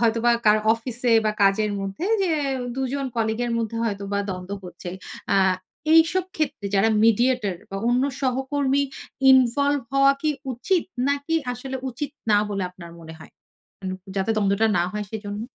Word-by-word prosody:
হয়তো 230 Hz, -1 st, +2 dB
বা 240 Hz, -, +6 dB, 0.2 s
কারো 210 Hz, 0 st, +6 dB
অফিস 230 Hz, +1 st, -5 dB
এ -, -, +5 dB
বা 215 Hz, -, +2 dB
কাজের 200 Hz, +2 st, +3 dB
মধ্যে 195 Hz, -, -4 dB, 0.2 s
যে 375 Hz, -, +1 dB, 0.5 s
দুজন 270 Hz, +1 st, -2 dB
কলিগ 220 Hz, 0 st, 0 dB
এর 240 Hz, -, -2 dB
মধ্যে 230 Hz, 0 st, -3 dB
হয়তোবা 200 Hz, -2 st, -2 dB
দ্বন্দ্ব 185 Hz, +1 st, -6 dB
হচ্ছে। 175 Hz, 0 st, -8 dB, 0.4 s
আ -, -, +4 dB, 0.6 s
এইসব 330 Hz, +3 st, +5 dB
ক্ষেত্রে, 285 Hz, -9 st, -2 dB
যারা 200 Hz, +3 st, +4 dB, 0.2 s
মিডিয়েটর 230 Hz, -3 st, +2 dB, 0.2 s
বা 195 Hz, -, -4 dB
অন্য 250 Hz, +2 st, +3 dB, 0.2 s
সহকর্মী 270 Hz, +1 st, 0 dB, 0.5 s
ইনভলভ 275 Hz, +3 st, +4 dB
হওয়া 275 Hz, 0 st, +5 dB
কি 310 Hz, -, +2 dB, 0.2 s
উচিত? 345 Hz, -, 0 dB, 0.3 s
নাকি 285 Hz, +3 st, -1 dB, 0.2 s
আসলে 260 Hz, +2 st, -5 dB
উচিত 275 Hz, +4 st, -5 dB, 0.2 s
না 205 Hz, -, +6 dB
বলে 200 Hz, -2 st, -2 dB
আপনার 175 Hz, -2 st, -12 dB
মনে 160 Hz, 0 st, -10 dB
হয়? -, -, -13 dB, 0.5 s
উ -, -, -3 dB, 0.3 s
যাতে 195 Hz, +3 st, 0 dB
দ্বন্দ্বটা 200 Hz, +1 st, +2 dB
না -, -, +3 dB
হয় 210 Hz, 0 st, -3 dB
সেজন্য? 205 Hz, -1 st, -5 dB
230 Hz, 160 wpm, -24 LUFS, 200-275 Hz, 0.6 s, বা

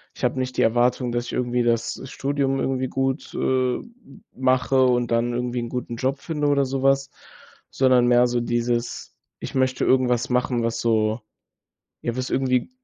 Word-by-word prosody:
ich -, -, -12 dB
habe 125 Hz, +1 st, +1 dB
nicht 130 Hz, 0 st, -3 dB
die -, -, +3 dB
Erwartung, 120 Hz, +1 st, +2 dB
dass 120 Hz, 0 st, -2 dB
ich -, -, -7 dB
irgendwie 125 Hz, -1 st, 0 dB
das 115 Hz, -1 st, 0 dB
Studium 135 Hz, 0 st, -1 dB
irgendwie 130 Hz, -1 st, -1 dB
gut, 135 Hz, +2 st, -2 dB
äh, 130 Hz, -1 st, +1 dB, 0.5 s
mache 130 Hz, +1 st, +2 dB
und 120 Hz, -1 st, +1 dB
dann 120 Hz, +1 st, +1 dB
irgendwie 125 Hz, 0 st, -2 dB
'n 120 Hz, -, -3 dB
guten 125 Hz, -2 st, -4 dB
Job 135 Hz, +2 st, -1 dB
finde 150 Hz, -3 st, -2 dB
oder 140 Hz, -1 st, +3 dB
sowas, 135 Hz, +1 st, +1 dB, 0.6 s
sondern 130 Hz, -2 st, +3 dB
mehr 120 Hz, 0 st, +5 dB
so 120 Hz, 0 st, 0 dB
dieses: 120 Hz, 0 st, -2 dB, 0.3 s
„Ich -, -, -7 dB
möchte 130 Hz, 0 st, +1 dB
irgendwas 125 Hz, -1 st, +2 dB
machen, 125 Hz, -1 st, 0 dB
was 115 Hz, 0 st, -1 dB
so 110 Hz, 0 st, +1 dB, 0.8 s
ja, 120 Hz, +1 st, -3 dB
was 130 Hz, 0 st, -3 dB
irgendwie 130 Hz, -, 0 dB
125 Hz, 170 wpm, -23 LUFS, 120-130 Hz, 0.8 s, mehr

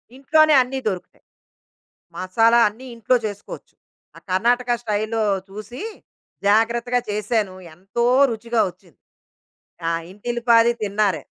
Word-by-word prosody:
ఇంట్లోనే 310 Hz, +3 st, +4 dB
అన్ని 265 Hz, +2 st, -3 dB
దొరుకుతాయి. 185 Hz, -3 st, -5 dB, 0.9 s
మసాలా 225 Hz, +6 st, +3 dB
అన్ని 225 Hz, +6 st, -8 dB
ఇంట్లో 230 Hz, +3 st, +1 dB
చేసుకోవచ్చు. 205 Hz, -1 st, -8 dB, 0.4 s
ఆ -, -, -12 dB
కర్ణాటక 245 Hz, +6 st, +1 dB
స్టైల్‌లో 215 Hz, +1 st, -1 dB, 0.3 s
చూసి 215 Hz, -, -9 dB, 0.7 s
జాగ్రత్తగా 235 Hz, +3 st, +2 dB
చేశాను. 210 Hz, -2 st, -1 dB, 0.2 s
ఎంతో 195 Hz, +7 st, -2 dB, 0.3 s
రుచిగా 230 Hz, +1 st, -1 dB
వచ్చింది. 175 Hz, -3 st, -21 dB, 0.9 s
ఆ! -, -, +1 dB, 0.2 s
ఇంటిల్లిపాది 235 Hz, +2 st, +2 dB
తిన్నారే. 200 Hz, -6 st, 0 dB
225 Hz, 100 wpm, -21 LUFS, 205-240 Hz, 0.9 s, ఇంట్లోనే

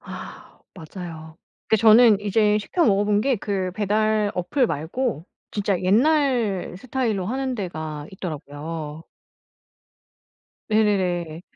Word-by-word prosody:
아 -, -, -11 dB
맞아요. 160 Hz, -2 st, -9 dB, 0.3 s
근데 220 Hz, -, +3 dB
저는 220 Hz, -1 st, +7 dB
이제 210 Hz, +1 st, +2 dB
시켜 335 Hz, -, 0 dB
먹어 205 Hz, -2 st, +3 dB
본 205 Hz, 0 st, +2 dB
게 265 Hz, +1 st, +1 dB
그 195 Hz, -3 st, -2 dB
배달 215 Hz, +1 st, +1 dB
어플 245 Hz, +9 st, +1 dB
말고 170 Hz, -, -3 dB, 0.2 s
진짜 200 Hz, -2 st, -1 dB
옛날 235 Hz, -, +2 dB
스타일로 225 Hz, -5 st, -2 dB
하는 260 Hz, +2 st, -2 dB
데가 155 Hz, -7 st, -5 dB
있더라고요. 155 Hz, -2 st, -6 dB, 1.7 s
네네네. 180 Hz, -6 st, +1 dB
205 Hz, 225 characters per minute, -23 LUFS, 175-220 Hz, 1.7 s, 저는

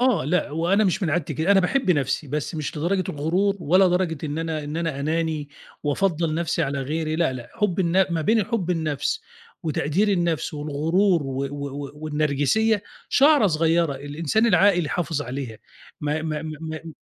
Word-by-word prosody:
آه، 250 Hz, -, +3 dB
لأ 170 Hz, +1 st, 0 dB
وأنا 175 Hz, +7 st, +2 dB
مش 190 Hz, +1 st, 0 dB
من 165 Hz, -, +1 dB
عادتي 165 Hz, -1 st, -1 dB
كده، 160 Hz, +5 st, 0 dB
أنا 195 Hz, -, +5 dB
باحب 250 Hz, +3 st, +1 dB
نفسي، 145 Hz, -1 st, 0 dB
بس 150 Hz, +4 st, -3 dB
مش 155 Hz, 0 st, -4 dB
لدرجة 185 Hz, +4 st, 0 dB
الغرور، 180 Hz, +7 st, 0 dB
ولا 185 Hz, +5 st, +4 dB
درجة 175 Hz, -4 st, 0 dB
إن 150 Hz, +1 st, -3 dB
أنا 160 Hz, -2 st, -3 dB
إن 150 Hz, +2 st, -5 dB
أنا 165 Hz, -4 st, -2 dB
أناني 155 Hz, -1 st, -1 dB, 0.3 s
وأفضّل 160 Hz, +1 st, 0 dB
نفسي 165 Hz, 0 st, 0 dB
على 140 Hz, -1 st, -1 dB
غيري، 155 Hz, +3 st, -2 dB
لأ، 165 Hz, -5 st, +1 dB
لأ 120 Hz, -2 st, -8 dB
حب 210 Hz, -5 st, 0 dB
الن 185 Hz, +2 st, +3 dB
ما 165 Hz, -, 0 dB
بين 220 Hz, +5 st, +3 dB
حب 195 Hz, -7 st, -2 dB
النفس 160 Hz, -, -1 dB, 0.4 s
وتقدير 160 Hz, +5 st, 0 dB
النفس 170 Hz, -5 st, 0 dB
والغرور 160 Hz, +5 st, +1 dB
و 135 Hz, 0 st, -3 dB
و 140 Hz, +1 st, -4 dB
و 140 Hz, 0 st, -6 dB
والنرجسية 155 Hz, +8 st, +1 dB, 0.3 s
شَعرَة 285 Hz, -5 st, +5 dB
صغيرة، 165 Hz, -2 st, +2 dB
الإنسان 145 Hz, +10 st, 0 dB
العاقل 180 Hz, -4 st, +4 dB
يحافظ 160 Hz, -2 st, -2 dB
عليها 125 Hz, -4 st, -6 dB, 0.4 s
ما 150 Hz, +1 st, -1 dB
ما 155 Hz, -1 st, -3 dB
ما 155 Hz, -1 st, -6 dB
ما 160 Hz, 0 st, -6 dB
160 Hz, 175 wpm, -24 LUFS, 150-180 Hz, 0.4 s, أنا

